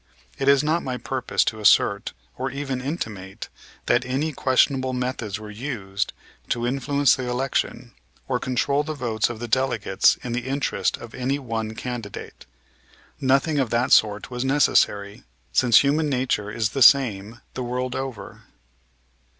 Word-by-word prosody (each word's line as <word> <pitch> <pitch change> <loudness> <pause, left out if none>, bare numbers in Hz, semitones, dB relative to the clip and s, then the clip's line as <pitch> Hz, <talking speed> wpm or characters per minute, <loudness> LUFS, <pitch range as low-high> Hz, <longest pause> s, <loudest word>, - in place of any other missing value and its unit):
It 135 - -1
is 140 +1 +5
not 160 +3 +1
my 130 -1 -4
purpose 130 0 -1
to 110 - -2
assert 105 - +3 0.2
or 130 +1 -3
even 135 -1 -4
intimate 110 - -6 0.4
that 120 0 +2
any 135 +5 -2
questionable 130 -1 +2
methods 125 -4 -3
were 105 -1 -9
used 105 -4 -4 0.4
to 120 0 -1
influence 140 +2 +2
the 125 -1 -4
election, 130 +2 -2 0.3
or - - 0
control 140 +3 0
the 155 +1 -5
votes 115 -5 -1
of 120 - -6
the 120 - -5
delegates 120 -5 +2
in 125 - -4
the 125 +2 -3
interest 135 +1 -1
of 120 -1 -11
any 130 +2 -1
one 115 -5 -4
candidate. 120 -4 -7 0.7
Nothing 140 +2 +2
of 130 -4 0
that 120 +4 0
sort 105 +2 +3
was 125 0 -3
necessary, 105 -7 +2 0.3
since 120 -3 +6
human 150 +2 +1
nature 125 -6 -1
is 110 0 -1
the 135 - -4
same 115 -5 +4
the 130 - -5
world 125 +1 -3
over. 130 -7 -6
125 Hz, 150 wpm, -23 LUFS, 110-135 Hz, 0.7 s, since